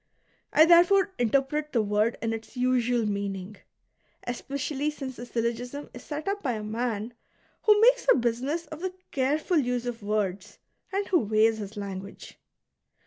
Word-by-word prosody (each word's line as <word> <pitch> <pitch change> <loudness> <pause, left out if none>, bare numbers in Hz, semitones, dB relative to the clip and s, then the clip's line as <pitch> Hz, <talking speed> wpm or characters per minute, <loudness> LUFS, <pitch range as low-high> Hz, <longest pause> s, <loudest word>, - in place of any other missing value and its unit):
I 315 - +7
therefore 365 +3 +5
interpret 275 +5 0
the 230 -3 +3
woi'd 210 +3 +1
in 225 0 0
its 225 +3 -8
usual 245 -2 +2
meaning, 200 -1 -3 0.7
especially 280 +4 -2
since 270 -4 -6
the 240 +1 -8
syllogism 240 +4 -3
is 245 - -9
set 300 +3 -6
up 400 +1 -1
by 255 -5 -1
a 215 -1 -4
man 225 +1 -3 0.5
who 425 -1 +6
makes - - +5
a - - +6
business 255 +8 -1
of 310 0 -9
the 370 0 -3 0.2
careful 300 +6 +1
use 245 -2 -1
of 240 -2 -4
words, 205 -1 -2 0.3
and 395 +1 -1
who 360 - +4
weighs 220 0 +2
his 205 +1 -7
language. 200 -1 -7
245 Hz, 155 wpm, -27 LUFS, 220-300 Hz, 0.7 s, I